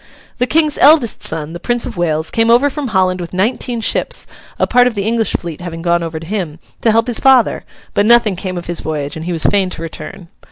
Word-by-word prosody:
The 250 - +1
King's 305 0 +2
eldest 285 -5 +5
son, 160 0 -3
the 175 - -7
Prince 240 +4 -1
of - - -6
Wales, 160 -2 -1
came 225 0 +1
over 250 +5 +4
from 290 -1 -4
Holland 185 -4 +1
with 170 - -7
nineteen 235 +4 -1
ships - - -1 0.3
(a - - +2
part 245 0 +4
of 240 - -2
the 200 - -2
English 225 0 0
fleet 170 -2 -4
having 165 -2 -7
gone 170 0 +1
over 165 -1 -5
to 165 - -10
him) 175 -5 -4 0.2
to 230 - +2
help 225 +1 +3
his 245 -2 0
father; 265 -4 +3 0.3
but 205 - +2
nothing 235 -4 +4
came 185 0 -5
of 175 - -6
his 175 0 -2
voyage, 150 -1 -4
and 160 0 -7
he 180 - -3
was 165 -2 +2
fain 195 -2 +2
to 175 - -7
return. 165 +2 -9
190 Hz, 240 wpm, -15 LUFS, 170-235 Hz, 0.3 s, eldest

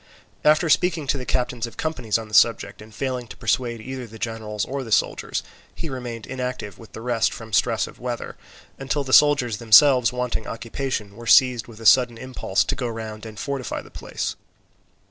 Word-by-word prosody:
After 155 +3 +4
speaking 165 -1 +2
to 140 - 0
the 125 - -7
captains 125 -1 -1
of 115 - -13
companies 125 -10 -1
on 110 -1 -7
the 105 - -16
subject, 115 0 +3
and 110 +1 -13
failing 125 +1 -3
to - - -11
persuade 120 0 -1
either 130 +1 -6
the 110 0 -12
generals 110 -2 -3
or 135 +1 -4
the 115 - -9
soldiers, - - 0 0.3
he 165 - -5
remained 120 -4 -6
inactive 125 -6 -5
with 115 - -14
the 110 - -8
rest 120 -2 +1
from 110 -2 -9
stress - - +2
of - - -13
weather; - - -5 0.4
until 135 +2 -1
the 130 -1 -4
soldiers 140 -7 +5
themselves 120 +2 +6
wanting 125 -2 -3
occupation 115 -3 -4
were 120 +1 -10
seized 125 -1 +5
with 115 -2 -13
a 115 - -10
sudden 120 +1 +5
impulse 130 +1 -1
to - - -2
go 125 - -3
round 110 -1 -6
and 110 -1 -10
fortify 140 -4 -4
the - - -16
place. - - -4
120 Hz, 195 wpm, -23 LUFS, 110-130 Hz, 0.4 s, themselves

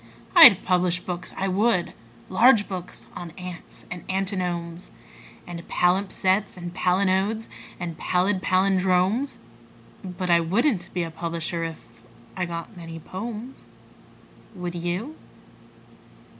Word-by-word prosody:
I'd 260 - +9
publish 180 -1 +2
books, 180 -1 -6
I 195 - 0
would 195 -1 +1 0.3
large 220 +2 +5
books 185 -2 -7
on 175 -1 -6
ants 180 -2 -10
and 180 -2 -6
antinomes 180 -3 -3 0.6
And 175 -1 -7
palimpsests 190 +2 +1
and 175 -1 -7
palinodes 190 +4 +1 0.3
and 170 -3 -5
pallid 185 +1 +1
pallindromes: 190 +6 +2 0.7
But 180 -1 -3
I 170 - +6
wouldn't 195 - +1
be 175 - +1
a 165 - -5
publisher 165 0 -3
if.... 135 -8 -8 0.3
I 185 - -1
got 170 +4 -6
many 165 -2 -8
"pomes." 220 - -7 0.9
Would 180 -2 -5
you? 175 - -3
180 Hz, 115 wpm, -25 LUFS, 175-195 Hz, 0.9 s, I'd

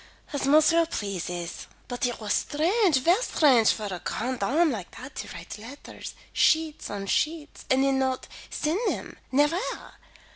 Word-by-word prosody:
"As 280 -1 -1
monsieur 315 +3 +5
pleases. 180 - -4 0.2
But 245 0 -1
it 245 - -4
was 215 -2 -1
strange, 340 - +2
ver 350 - +4
strange 260 - +4
for 215 - -4
a 185 -3 -4
grande 250 +2 -2
dame 315 +5 +3
like 200 -7 -5
that 260 +2 -9
to - - -4
write 170 +5 -8
letters 250 +7 -9 0.2
sheets 315 -1 +2
on 200 -1 -4
sheets 305 +8 -1
and 260 +1 +4
then 270 -1 +2
not 260 -1 -1 0.2
send 310 +5 -1
them, - - -6 0.2
nevaire. 295 +7 0
270 Hz, 155 wpm, -27 LUFS, 220-315 Hz, 0.2 s, monsieur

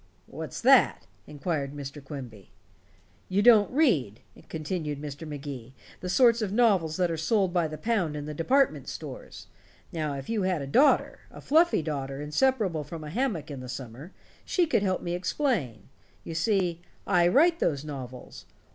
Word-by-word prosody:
"What's - - -7
that?" - - +5 0.2
inquired 145 -2 -3
Mr. 140 0 -7
Quimby. 125 -8 -9 0.8
"You 195 +2 +2
don't 220 -3 +6
read," 165 - +1 0.3
continued 155 -2 -4
Mr. 150 +2 -7
Magee, 135 -4 -7 0.2
"the 180 - -5
sort 235 +3 +4
of 205 -3 -2
novels 195 -9 +2
that 180 -2 +1
are 165 - -2
sold 190 +3 +1
by 175 -3 +2
the 155 0 -7
pound 205 -9 -1
in 145 -1 -5
the 150 - -5
department 265 - +1
stores. - - -8 0.5
Now, 155 -3 -2
if 135 -1 -7
you 225 -2 -1
had 185 -6 0
a - - -4
daughter 265 - +3
a - - -12
fluffy 325 - +3
daughter 140 -3 -4
inseparable 170 - +1
from 155 +2 -8
a 150 - -7
hammock 195 - -2
in 140 - -6
the 130 0 -8
summer 130 - -8 0.3
she 360 - +1
could 310 -9 +1
help 185 -2 -1
me 175 - -2
explain. 180 - -1 0.4
You 165 - -6
see 175 -1 0 0.2
I 175 -3 +3
write 330 - +4
those 145 -1 0
novels. 130 -4 -8
165 Hz, 165 wpm, -27 LUFS, 145-205 Hz, 0.8 s, don't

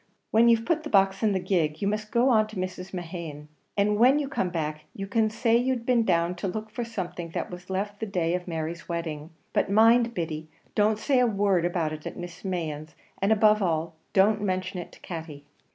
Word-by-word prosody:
When 230 +2 +5
you've 230 -1 +3
put 325 +2 +1
the 305 - -7
box 195 -3 +3
in 215 - +3
the 190 - +1
gig 170 -5 0
you 200 - -1
must 210 +1 -2
go 245 +2 +3
on 215 -3 +4
to 215 - -12
Mrs. 185 0 -4
Mehan's, 165 -4 -6 0.3
and 205 +1 +2
when 255 +5 +6
you 295 -2 -1
come 230 -9 -1
back 155 -3 -3
you 195 - -4
can 215 +2 +1
say 225 +1 +2
you'd 245 0 +1
been 240 -2 +3
down 170 -3 +2
to 195 - -3
look 215 +3 -5
for 240 +2 -3
something 180 -7 -5
that - - -3
was 180 +1 -9
left 205 +2 -3
the 220 - -3
day 175 -4 0
of 180 0 -3
Mary's 165 +1 -4
wedding; 160 -3 -4 0.2
but - - +1
mind, 230 +3 +5
Biddy, 160 -3 -3 0.3
don't 210 +1 +3
say 260 +4 +2
a 250 - +4
word 200 -5 +2
about 170 -3 0
it 155 0 -7
at - - -7
Mrs. 175 +2 -8
Mehan's, 160 -4 -4 0.3
and 195 +2 +2
above 215 0 +5
all, 165 -2 0 0.2
don't 205 +2 +4
mention 185 -1 -2
it 175 - -8
to - - -15
Katty." 160 -4 -7
190 Hz, 220 wpm, -27 LUFS, 170-220 Hz, 0.3 s, when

